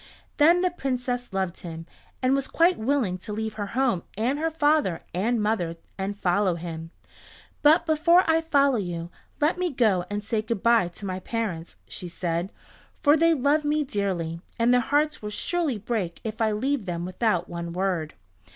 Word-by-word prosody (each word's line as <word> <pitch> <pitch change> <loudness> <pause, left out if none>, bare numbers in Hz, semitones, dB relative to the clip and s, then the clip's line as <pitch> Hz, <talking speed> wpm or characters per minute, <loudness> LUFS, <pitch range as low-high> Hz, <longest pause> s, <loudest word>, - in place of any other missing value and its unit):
Then 335 +4 +5
the 365 -1 +2
Princess 250 -6 -3
loved 190 -2 -2
him, 165 -1 -7 0.4
and 255 +1 +3
was 275 -1 0
quite 345 +2 +3
willing 220 -6 0
to 200 - -8
leave 220 +1 -3
her 205 -2 -4
home 255 -9 +2 0.2
and 250 +7 0
her 325 +1 +1
father 300 - +1
and 225 +7 +1
mother 210 -6 0 0.2
and 200 +1 -3
follow 185 -1 +1
him. 165 -1 -6 0.7
"But 315 +4 +5
before 335 +3 +4
I 325 0 +3
follow 280 -5 +3
you, 175 -3 -4 0.3
let 310 +4 +2
me 365 -1 +1
go 210 -9 +2
and 205 0 -3
say 215 +1 -1
good 220 -2 -4
by 230 -5 +4
to 175 +4 -9
my 185 -1 -3
parents," 190 -6 -4
she 180 - -7
said, 175 +1 -3 0.5
"for 290 0 +6
they 330 +1 +4
love 290 +3 +2
me 300 +1 +1
dearly, 185 - -2 0.2
and 235 +1 +3
their 250 - +5
hearts 300 +4 +1
will 210 - -4
surely 305 +4 -1
break 205 -5 -3
if 220 0 -5
I 220 -1 +3
leave 250 +2 -1
them 170 -1 -3
without 185 -1 0
one 170 0 -5
word." 175 -4 -2
220 Hz, 180 wpm, -26 LUFS, 180-285 Hz, 0.7 s, for